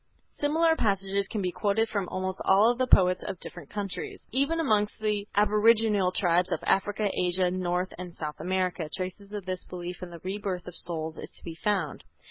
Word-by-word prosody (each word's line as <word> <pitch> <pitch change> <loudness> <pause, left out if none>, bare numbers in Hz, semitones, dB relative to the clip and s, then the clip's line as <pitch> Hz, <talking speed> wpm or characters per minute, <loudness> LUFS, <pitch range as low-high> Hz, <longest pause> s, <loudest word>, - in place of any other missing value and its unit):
Similar 320 +3 +2
passages 195 -4 +1
can 210 -2 -3
be 180 - 0
quoted 210 +4 +1
from 200 -4 -2
almost 185 0 -3
all 210 +5 +5
the 255 +1 0
poets 180 -5 +5
of 185 - -5
different 175 -5 -9
countries. 200 -2 -4
Even 280 +6 +1
amongst 215 -10 +1
the 210 -1 -1
aboriginal 210 -1 +4
tribes 180 -1 +2
of - - -1
Africa, 205 +1 +1
Asia, 180 0 +2
North 180 0 -1
and 180 -2 -7
South 150 -1 -5
America, 180 -1 -1
traces 185 +3 -5
of 205 -3 -5
this 185 -1 -3
belief 175 0 -6
in 180 - -6
the 170 -1 -10
rebirth 190 -1 -3
of 180 - -9
souls 160 -2 -4
is - - -7
to - - -16
be 165 - -6
found. 175 -3 -1
190 Hz, 185 wpm, -28 LUFS, 180-210 Hz, -, all